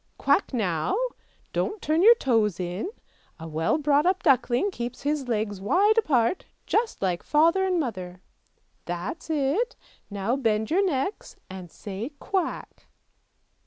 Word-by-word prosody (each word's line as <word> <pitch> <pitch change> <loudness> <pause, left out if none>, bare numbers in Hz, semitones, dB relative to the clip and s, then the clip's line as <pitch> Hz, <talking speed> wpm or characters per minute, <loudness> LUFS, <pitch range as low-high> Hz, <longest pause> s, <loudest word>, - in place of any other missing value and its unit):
Quack - - +2
now! 185 - 0 0.6
don't 420 0 -1
turn 315 +1 +1
your 460 +5 +8
toes 225 - +1
in, 180 - -3 0.5
a 165 - -7
well 160 - 0
brought 295 +1 +2
up 375 +1 +1
duckling 260 - +3
keeps 240 -4 -6
his 290 -2 -1
legs 210 -4 -2
wide 395 - +3
apart 300 - +2 0.2
just 445 - 0
like 180 -2 0
father 335 +5 +3
and 365 -2 +1
mother; 185 - -4 0.7
that's 175 - -5
it, 315 - 0 0.3
now 205 +4 -1
bend 220 -4 0
your 380 +4 +3
necks, 350 +2 -2 0.2
and 185 -2 -8
say 205 - -6
quack! 370 0 -3
260 Hz, 135 wpm, -26 LUFS, -, 0.7 s, your